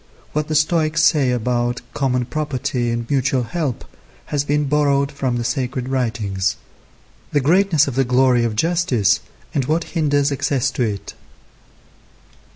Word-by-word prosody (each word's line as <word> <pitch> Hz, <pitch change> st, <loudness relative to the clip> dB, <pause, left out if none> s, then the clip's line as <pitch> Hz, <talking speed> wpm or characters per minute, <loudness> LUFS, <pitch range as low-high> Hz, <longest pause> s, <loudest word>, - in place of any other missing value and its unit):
What 150 Hz, 0 st, -1 dB
the 155 Hz, -, -2 dB
Stoics 155 Hz, +1 st, +2 dB
say 145 Hz, -4 st, +4 dB
about 120 Hz, 0 st, -1 dB
common 125 Hz, -3 st, 0 dB
property 130 Hz, -4 st, -2 dB
and 115 Hz, 0 st, -2 dB
mutual 135 Hz, -1 st, +1 dB
help 145 Hz, -1 st, -3 dB, 0.4 s
has 145 Hz, -1 st, -1 dB
been 145 Hz, 0 st, 0 dB
borrowed 140 Hz, -1 st, +2 dB
from 135 Hz, -4 st, -2 dB
the 120 Hz, -, -2 dB
sacred 125 Hz, +1 st, -2 dB
writings. 110 Hz, -7 st, -1 dB, 0.8 s
The 145 Hz, -, +4 dB
greatness 160 Hz, +1 st, +3 dB
of 135 Hz, -, -2 dB
the 135 Hz, +2 st, +2 dB
glory 125 Hz, -1 st, +3 dB
of 115 Hz, -2 st, -1 dB
justice, 125 Hz, -, +2 dB, 0.3 s
and 140 Hz, -4 st, 0 dB
what 160 Hz, +4 st, 0 dB
hinders 145 Hz, -3 st, +2 dB
access 135 Hz, -1 st, 0 dB
to -, -, -4 dB
it. 105 Hz, -4 st, -2 dB
135 Hz, 145 wpm, -20 LUFS, 120-150 Hz, 0.8 s, say